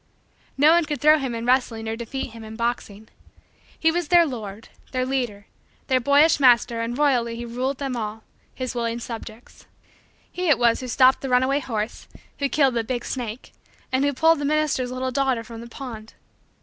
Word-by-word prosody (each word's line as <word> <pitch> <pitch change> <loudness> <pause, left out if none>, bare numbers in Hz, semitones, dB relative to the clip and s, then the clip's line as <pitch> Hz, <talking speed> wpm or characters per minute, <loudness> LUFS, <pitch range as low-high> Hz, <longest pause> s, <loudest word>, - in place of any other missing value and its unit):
No 295 +3 +6
one 340 -1 +4
could 295 -1 -3
throw 305 +1 +5
him 260 -4 -3
in 230 0 -4
wrestling 245 -3 +1
or 220 - -2
defeat 240 +2 -5
him 225 0 -11
in 220 0 -9
boxing. 220 -2 -3 0.7
He 325 - +3
was 345 -1 -2
their 345 0 +6
lord, 220 -6 -7 0.2
their 255 0 0
leader, 245 -6 -2 0.4
their 260 -1 +3
boyish 285 +4 +4
master 240 -3 +4
and 235 +2 -3
royally 250 -6 +2
he 240 +1 -6
ruled 250 +3 -3
them 270 -2 -3
all 220 -1 -5 0.3
his 255 -1 -4
willing 235 -1 -2
subjects. 230 -1 -9 0.6
He 360 -1 -2
it 295 - +5
was 235 -1 +3
who 255 - -6
stopped 260 +2 +4
the 270 - -4
runaway 260 +3 +3
horse; 225 -5 -4 0.3
who 280 -1 0
killed 275 -3 +3
the 230 -1 0
big 240 +1 -3
snake; 240 -2 -5 0.4
and 260 +1 +1
who 285 - +2
pulled 320 +3 +3
the - - -3
minister's 290 -4 0
little 255 +1 -3
daughter 260 -3 0
from 230 0 -10
the 235 - -10
pond. 230 -4 -9
250 Hz, 190 wpm, -23 LUFS, 230-275 Hz, 0.7 s, No